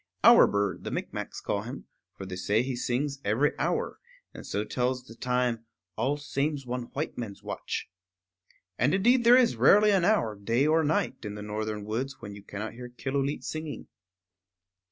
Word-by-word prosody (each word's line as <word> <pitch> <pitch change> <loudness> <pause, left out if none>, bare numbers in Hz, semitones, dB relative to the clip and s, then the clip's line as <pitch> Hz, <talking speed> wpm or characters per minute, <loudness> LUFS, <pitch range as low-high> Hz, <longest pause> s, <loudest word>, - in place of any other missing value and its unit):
"Hour - - +9
Bird" 100 -1 -1
the - - -4
Micmacs - - -4
call - - -1
him; - - -8 0.3
for 95 - -6
they 95 -1 -6
say 100 +5 +1
he 130 0 -3
sings 135 +3 -1
every 115 +9 +2
hour, - - -1 0.3
and - - -10
so 105 - -1
tells 125 +3 -1
the 120 - -12
time, 125 -1 -1 0.3
"all 145 +2 0
same's 145 0 -2
one 125 0 -3
white 150 -1 -3
man's 105 -5 -6
watch." - - -4 0.9
And 125 +8 +3
indeed 240 +6 +4
there 240 +2 +8
is 250 -3 +3
rarely 210 +1 +6
an 195 -3 +3
hour, 175 - +2
day 115 +7 +1
or 160 +1 +3
night, 155 -4 0
in 105 -1 -5
the 105 - -7
northern 105 0 -4
woods 125 +6 -3
when 105 -3 -8
you 100 - -10
cannot 105 +2 -6
hear 125 +1 -8
Killooleet 135 +3 -2
singing. 155 -5 -5
125 Hz, 175 wpm, -28 LUFS, 110-145 Hz, 0.9 s, Hour